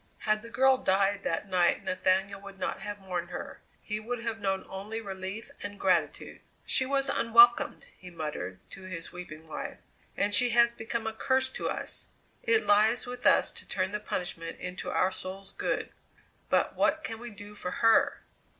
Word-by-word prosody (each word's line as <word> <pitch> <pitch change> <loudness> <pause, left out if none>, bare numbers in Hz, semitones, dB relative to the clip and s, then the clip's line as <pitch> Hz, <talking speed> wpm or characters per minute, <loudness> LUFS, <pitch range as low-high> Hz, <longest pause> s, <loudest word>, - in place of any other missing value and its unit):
Had 215 0 +1
the 230 - -10
girl 265 +2 +4
died 195 -1 +2
that 170 +5 -1
night 180 -2 +2
Nathaniel 190 +2 +1
would 200 -1 -11
not - - -3
have 205 +1 -5
mourned 180 -3 -4
her, - - -7 0.2
he 210 0 -3
would 240 +3 -3
have 225 -1 -3
known 195 -2 -1
only 205 +4 -5
relief 195 +3 -6
and 205 0 -6
gratitude. 185 - 0 0.2
"She 260 - +2
was 275 0 +1
unwelcomed," 235 +1 +5
he 180 - -10
muttered 150 - -5
to - - -10
his 175 -3 -7
weeping 160 -3 -9
wife; - - -6 0.4
"and 205 +1 +1
she 245 +3 +5
has 235 0 +5
become 230 0 -4
a 220 - -2
curse 260 +3 +1
to - - -3
us. - - -5 0.3
It 460 -2 +3
lies 215 +4 +4
with 245 0 -1
us - - +5
to - - -10
turn 190 0 -1
the 210 - -2
punishment 165 -4 -4
into 180 +1 -5
our 185 - +2
souls' 190 +1 -7
good; - - -2 0.6
but - - +2
what 315 - +2
can 225 -1 -5
we 240 +1 -7
do 205 -1 -11
for 185 -3 -5
her?" 230 +8 +3
205 Hz, 180 wpm, -29 LUFS, 185-235 Hz, 0.6 s, unwelcomed